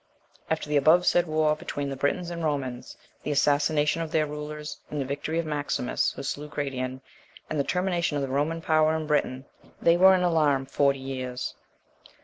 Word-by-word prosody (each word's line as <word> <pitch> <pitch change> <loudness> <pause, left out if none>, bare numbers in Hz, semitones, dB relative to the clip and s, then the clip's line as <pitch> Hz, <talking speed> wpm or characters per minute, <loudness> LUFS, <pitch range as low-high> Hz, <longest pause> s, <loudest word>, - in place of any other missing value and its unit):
After 160 -1 -1
the 150 0 +2
above 160 +5 +5
said 175 0 +3
war 155 -1 +2
between 145 -2 -4
the - - -3
Britons 145 +6 -1
and 170 -1 -5
Romans, 135 -5 -3 0.2
the - - -5
assassination 150 +2 +2
of 165 - -3
their 160 -2 +2
rulers, 150 0 -6
and 150 - -4
the 135 - -1
victory 145 +4 -3
of 170 - 0
Maximus, 145 -4 -1
who 135 - -7
slew 145 +2 -4
Gratian, 130 -3 -4 0.5
and 155 - -1
the - - +3
termination 175 -2 0
of 140 - -1
the 135 - -3
Roman 150 +5 -1
power 155 0 +3
in 160 -1 -2
Britain, 140 -3 0 0.3
they 170 0 +4
were 190 +1 +7
in 180 - +1
alarm 150 -6 +2
forty 140 0 +2
years. 130 -2 -4
150 Hz, 185 wpm, -26 LUFS, 140-160 Hz, 0.5 s, were